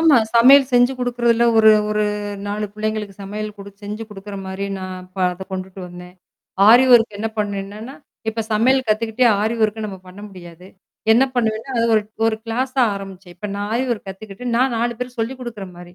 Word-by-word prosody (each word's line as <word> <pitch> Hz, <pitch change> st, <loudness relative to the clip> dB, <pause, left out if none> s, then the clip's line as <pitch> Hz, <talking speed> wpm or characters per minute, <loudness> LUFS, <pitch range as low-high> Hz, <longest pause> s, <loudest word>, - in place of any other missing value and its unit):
ஆமா. 320 Hz, -4 st, +6 dB, 0.2 s
சமையல் 265 Hz, +3 st, +7 dB
செஞ்சு 245 Hz, +1 st, +4 dB
குடுக்குறதில 235 Hz, -1 st, +1 dB
ஒரு 220 Hz, 0 st, +7 dB, 0.2 s
ஒரு 210 Hz, 0 st, +1 dB, 0.4 s
நாலு 210 Hz, +1 st, -2 dB
பிள்ளைங்களுக்கு 215 Hz, -1 st, -3 dB
சமையல் 210 Hz, +2 st, -5 dB
குடு 200 Hz, 0 st, -10 dB
செஞ்சு 210 Hz, +2 st, -6 dB
குடுக்குறமாரி 195 Hz, -1 st, -6 dB
நான் 185 Hz, -1 st, -8 dB
ப -, -, -10 dB
அத 185 Hz, +2 st, -8 dB
கொண்டுட்டு 190 Hz, 0 st, -6 dB
வந்தேன். 180 Hz, 0 st, -12 dB, 0.5 s
ஆரி 245 Hz, +4 st, +8 dB
ஒர்க் 225 Hz, -3 st, +3 dB
என்ன 225 Hz, +2 st, -2 dB
பண்ணுவேன்னா, 205 Hz, +4 st, -4 dB, 0.3 s
இப்ப 225 Hz, +1 st, -1 dB
சமையல் 255 Hz, +5 st, +3 dB
கத்துக்கிட்டே 225 Hz, +3 st, +1 dB
ஆரி 220 Hz, +2 st, 0 dB
ஒர்க்க 215 Hz, 0 st, 0 dB
நம்ம 195 Hz, -2 st, -8 dB
பண்ண 185 Hz, +2 st, -12 dB
முடியாது. 175 Hz, -2 st, -13 dB, 0.5 s
என்ன 245 Hz, +4 st, +5 dB
பண்ணுவேன்னா, 225 Hz, +1 st, -1 dB
அது 230 Hz, -, +2 dB
ஒரு, 215 Hz, -, +3 dB, 0.2 s
ஒரு 225 Hz, -1 st, +1 dB
கிளாஸா 255 Hz, +3 st, 0 dB
ஆரம்பிச்சேன். 195 Hz, -2 st, -10 dB
இப்ப 210 Hz, +4 st, -6 dB
நான் 205 Hz, +1 st, -4 dB
ஆரி 245 Hz, +3 st, +1 dB
ஒர்க் 210 Hz, -3 st, -7 dB
கத்துக்கிட்டு 200 Hz, +4 st, -9 dB
நான் 255 Hz, 0 st, +2 dB
4 240 Hz, +1 st, 0 dB
பேருக்கு 250 Hz, -1 st, -5 dB
சொல்லிக் 255 Hz, +3 st, -3 dB
குடுக்குற 225 Hz, -5 st, -7 dB
மாரி. 175 Hz, -, -12 dB
215 Hz, 175 wpm, -20 LUFS, 195-235 Hz, 0.5 s, ஆரி